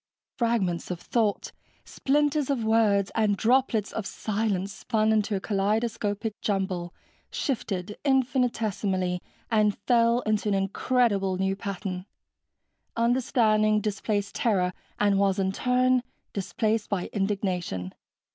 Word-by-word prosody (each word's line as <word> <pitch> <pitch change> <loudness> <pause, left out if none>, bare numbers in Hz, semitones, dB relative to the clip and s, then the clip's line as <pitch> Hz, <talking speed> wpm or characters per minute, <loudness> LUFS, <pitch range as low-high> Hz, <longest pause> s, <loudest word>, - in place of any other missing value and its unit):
Fragments 215 -9 0
of 180 -2 -3
thought, 215 +1 -1 0.3
splinters 295 0 +1
of 265 -5 0
words, 215 -3 +3
and 210 -3 +2
droplets 235 -2 +2
of 220 -3 -4
silence 200 -2 -2
spun 220 +1 0
into 215 -1 +1
a - - 0
kaleidoscopic 210 +1 -1
jumble, 190 -4 -1 0.4
shifted 210 - -3
infinitesimally, 225 -9 0 0.3
and 210 -2 +3
fell 235 0 +4
into 215 -2 0
an 200 - +2
incredible 195 -1 +1
new 190 +1 0
pattern. 195 -1 -5 0.9
Understanding 230 -3 +3
displaced 205 -1 -2
terror 185 -6 +1 0.3
and 205 -1 +3
was, 195 -1 +2
in 190 -1 +1
turn, 255 +3 +2 0.3
displaced 215 +2 -1
by 195 -3 -2
indignation. 185 - -2
210 Hz, 110 wpm, -27 LUFS, 195-230 Hz, 0.9 s, fell